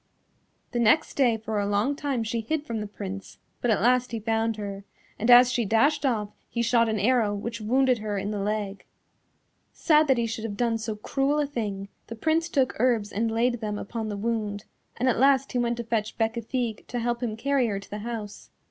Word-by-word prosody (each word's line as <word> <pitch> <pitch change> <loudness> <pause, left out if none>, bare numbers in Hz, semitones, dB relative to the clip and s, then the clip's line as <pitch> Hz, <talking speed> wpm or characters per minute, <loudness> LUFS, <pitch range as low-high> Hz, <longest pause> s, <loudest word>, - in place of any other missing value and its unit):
The 240 - -1
next 235 +7 +3
day 245 -5 +3
for 220 -1 -3
a 200 - 0
long 205 +8 +1
time 280 -5 -2
she 225 +1 -2
hid 300 +6 -2
from 225 -4 -3
the 210 - -4
Prince, 195 -1 -7 0.2
but 245 - 0
at 215 -2 +2
last 250 +1 +3
he 230 - -3
found 225 0 0
her, 200 -1 -6 0.4
and 225 - -1
as 245 +1 +8
she 245 -1 +1
dashed 275 +8 +2
off 215 -5 -1 0.2
he 235 - -1
shot 230 0 +3
an 220 - 0
arrow 215 -1 +2
which 220 +2 -5
wounded 255 +2 +2
her 210 -1 -3
in 200 +2 -2
the 210 - -3
leg. 205 -1 -2 0.9
Sad 305 -2 +3
that 265 -2 +3
he 235 - +1
should 225 -1 -4
have 205 -3 -4
done 230 -2 +1
so 220 -1 -3
cruel 275 +7 0
a 295 - +2
thing, 205 -8 -4 0.2
the 230 - -7
Prince 320 +7 +1
took 270 -5 +1
herbs 230 -4 +2
and 225 +2 0
laid 240 +1 0
them 210 -1 -3
upon 220 +1 -4
the 205 - -4
wound, 210 -2 -2 0.3
and 255 - 0
at 245 - +2
last 275 0 +4
he 250 - 0
went 235 0 0
to 235 - -3
fetch 225 -2 -2
Bécafigue 225 0 -2
to 245 - -4
help 240 0 -1
him 220 -3 -2
carry 275 0 +1
her 200 -3 -2
to 200 - -14
the 210 - -4
house. 220 -2 -6
230 Hz, 220 wpm, -26 LUFS, 210-250 Hz, 0.9 s, as